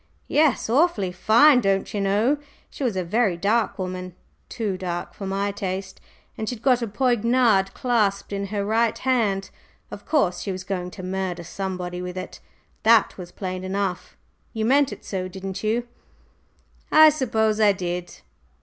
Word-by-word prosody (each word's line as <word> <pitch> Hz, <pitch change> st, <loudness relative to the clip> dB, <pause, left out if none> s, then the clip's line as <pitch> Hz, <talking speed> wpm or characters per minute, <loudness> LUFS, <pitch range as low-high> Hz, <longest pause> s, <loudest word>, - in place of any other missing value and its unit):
"Yes, 300 Hz, -4 st, +2 dB
awfully 235 Hz, -, +2 dB
fine, 235 Hz, +9 st, +5 dB
don'cher 195 Hz, 0 st, 0 dB
know! 210 Hz, +9 st, +2 dB, 0.3 s
She -, -, -6 dB
was 240 Hz, -6 st, 0 dB
a 185 Hz, -, 0 dB
very 195 Hz, 0 st, +1 dB
dark 215 Hz, +5 st, +1 dB
woman 185 Hz, -1 st, -5 dB, 0.3 s
too 210 Hz, -5 st, -2 dB
dark 175 Hz, -2 st, -4 dB
for 195 Hz, -, -7 dB
my 200 Hz, +1 st, -1 dB
taste, 190 Hz, -1 st, -5 dB, 0.3 s
and 220 Hz, -, -4 dB
she'd 235 Hz, -3 st, -7 dB
got 250 Hz, -2 st, +3 dB
a 235 Hz, -, -1 dB
poignard 235 Hz, -3 st, +2 dB
clasped 210 Hz, -6 st, 0 dB
in 200 Hz, 0 st, -3 dB
her 200 Hz, 0 st, -2 dB
right 225 Hz, +2 st, +1 dB
hand. 220 Hz, -7 st, 0 dB, 0.4 s
Of -, -, -10 dB
course, 185 Hz, -, +1 dB
she 200 Hz, -, -3 dB
was 185 Hz, 0 st, -5 dB
going 185 Hz, -2 st, -3 dB
to 185 Hz, -, -7 dB
murder 185 Hz, -1 st, -3 dB
somebody 180 Hz, 0 st, -5 dB
with 180 Hz, 0 st, -6 dB
it; 185 Hz, -, -7 dB, 0.4 s
that 230 Hz, 0 st, +4 dB
was 175 Hz, -1 st, -8 dB
plain 185 Hz, -1 st, -5 dB
enough. 190 Hz, -1 st, -3 dB, 0.4 s
You 220 Hz, -2 st, -1 dB
meant 275 Hz, +3 st, +3 dB
it -, -, -10 dB
so, 185 Hz, -2 st, -3 dB
didn't 190 Hz, +1 st, -6 dB
you?" 235 Hz, +3 st, 0 dB, 1.0 s
"I 310 Hz, 0 st, +9 dB
suppose 220 Hz, -7 st, 0 dB
I 210 Hz, -2 st, +6 dB
did." 180 Hz, -2 st, -5 dB
200 Hz, 160 wpm, -23 LUFS, 185-230 Hz, 1.0 s, I